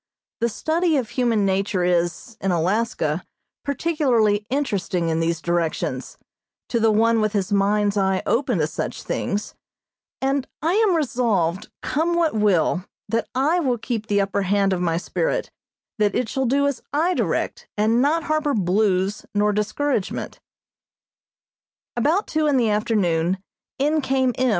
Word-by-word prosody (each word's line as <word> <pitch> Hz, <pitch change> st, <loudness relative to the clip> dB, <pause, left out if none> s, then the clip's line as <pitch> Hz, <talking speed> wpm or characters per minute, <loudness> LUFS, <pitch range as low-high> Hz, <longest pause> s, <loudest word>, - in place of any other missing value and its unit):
The 235 Hz, +1 st, +1 dB
study 320 Hz, -, +1 dB
of 240 Hz, -4 st, -2 dB
human 235 Hz, -4 st, +1 dB
nature 195 Hz, -1 st, 0 dB
is, 175 Hz, +5 st, 0 dB
in 195 Hz, -, 0 dB
Alaska, 180 Hz, -2 st, 0 dB, 0.4 s
particularly 250 Hz, -9 st, +1 dB
interesting 200 Hz, -, -1 dB
in 160 Hz, 0 st, 0 dB
these 165 Hz, 0 st, 0 dB
directions, 170 Hz, -1 st, -2 dB, 0.5 s
to 235 Hz, -, +1 dB
the 225 Hz, 0 st, +4 dB
one 225 Hz, +1 st, +3 dB
with 215 Hz, -1 st, 0 dB
his 200 Hz, -2 st, -1 dB
mind's 205 Hz, +1 st, +2 dB
eye 190 Hz, -1 st, +1 dB
open 245 Hz, -3 st, +1 dB
to 155 Hz, -, +2 dB
such 155 Hz, -, -4 dB
things, 205 Hz, +1 st, -2 dB, 0.7 s
and 270 Hz, 0 st, 0 dB
I 325 Hz, +4 st, +1 dB
am 420 Hz, -3 st, +3 dB
resolved, 225 Hz, -, 0 dB
come 335 Hz, +3 st, 0 dB
what 335 Hz, -2 st, +2 dB
will, 185 Hz, -5 st, +2 dB, 0.3 s
that 230 Hz, 0 st, 0 dB
I 300 Hz, +7 st, +2 dB
will 260 Hz, -7 st, +1 dB
keep 225 Hz, -1 st, -4 dB
the 205 Hz, -1 st, +2 dB
upper 195 Hz, 0 st, -1 dB
hand 195 Hz, 0 st, +2 dB
of 180 Hz, -, -2 dB
my 165 Hz, -2 st, +1 dB
spirit, -, -, -2 dB, 0.5 s
that 205 Hz, -2 st, +2 dB
it 250 Hz, -, 0 dB
shall 265 Hz, +3 st, -1 dB
do 280 Hz, +3 st, +2 dB
as 280 Hz, -2 st, -1 dB
I 320 Hz, +6 st, +2 dB
direct, 480 Hz, +6 st, -2 dB
and 220 Hz, +3 st, +3 dB
not 310 Hz, +4 st, +2 dB
harbor 310 Hz, -2 st, 0 dB
"blues" 195 Hz, 0 st, +1 dB
nor 210 Hz, 0 st, +3 dB
discouragement. 215 Hz, +2 st, -2 dB, 1.6 s
About 305 Hz, -, +2 dB
two 310 Hz, -1 st, 0 dB
in 285 Hz, -2 st, +3 dB
the 230 Hz, -4 st, +2 dB
afternoon 190 Hz, -5 st, +1 dB, 0.4 s
in 300 Hz, +3 st, +2 dB
came 265 Hz, -2 st, +1 dB
M. 255 Hz, 0 st, +3 dB
220 Hz, 150 wpm, -22 LUFS, 195-275 Hz, 1.6 s, the